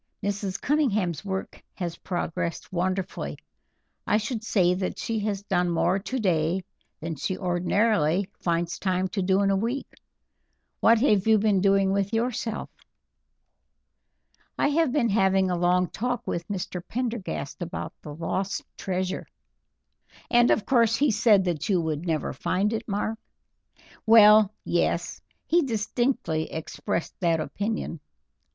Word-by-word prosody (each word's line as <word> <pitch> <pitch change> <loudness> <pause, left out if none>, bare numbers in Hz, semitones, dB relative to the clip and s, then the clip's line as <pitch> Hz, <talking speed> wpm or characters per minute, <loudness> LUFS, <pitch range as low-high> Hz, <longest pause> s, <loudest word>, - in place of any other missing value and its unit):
Mrs. 200 -1 -2
Cunningham's 215 - 0
work 190 -1 -5
has 175 -3 -4
progressed 175 -1 -4
wonderfully. 185 +1 -2 0.7
I 210 - +4
should 220 +1 -3
say 185 -5 +3
that 185 0 -3
she 225 -1 -2
has 205 -1 -2
done 180 -3 +1
more 170 +3 +1
today 190 -6 0 0.4
than 165 +1 -3
she 185 +7 -3
ordinarily 180 0 +1
finds 170 0 -1
time 185 -1 0
to 195 +2 -2
do 190 +2 +2
in 195 - +3
a - - +3
week. 235 +7 -1 0.9
What 230 +1 +5
have 210 -6 +3
you 220 -1 +6
been 205 -2 +2
doing 195 0 +3
with 200 +2 0
yourself?" 225 -1 -2 1.9
"I - - +2
have 310 -2 +2
been 245 -4 +2
having 190 -2 +3
a - - +1
long 180 +1 +2
talk 245 +4 -3
with 170 0 -3
Mr. 185 -3 -4
Prendergast 230 - -4
about 170 -1 -5
the 150 -2 -8
lost 190 +4 -2
treasure." 185 0 -3 1.0
"And 240 -1 +5
of 210 - +2
course 230 -4 +3
he 285 +1 +3
said 210 -2 +4
that 175 -2 -2
you 190 -3 +3
would 160 +1 -2
never 155 -3 -1
find 190 - 0
it, 225 +1 -4
Mark?" 215 +2 -2 0.9
"Well, 215 -2 +8
yes, - - 0 0.2
he 345 +2 +3
distinctly 225 - -1
expressed 160 +1 -4
that 170 -3 +2
opinion." 200 +1 -3
195 Hz, 135 wpm, -26 LUFS, 180-220 Hz, 1.9 s, Well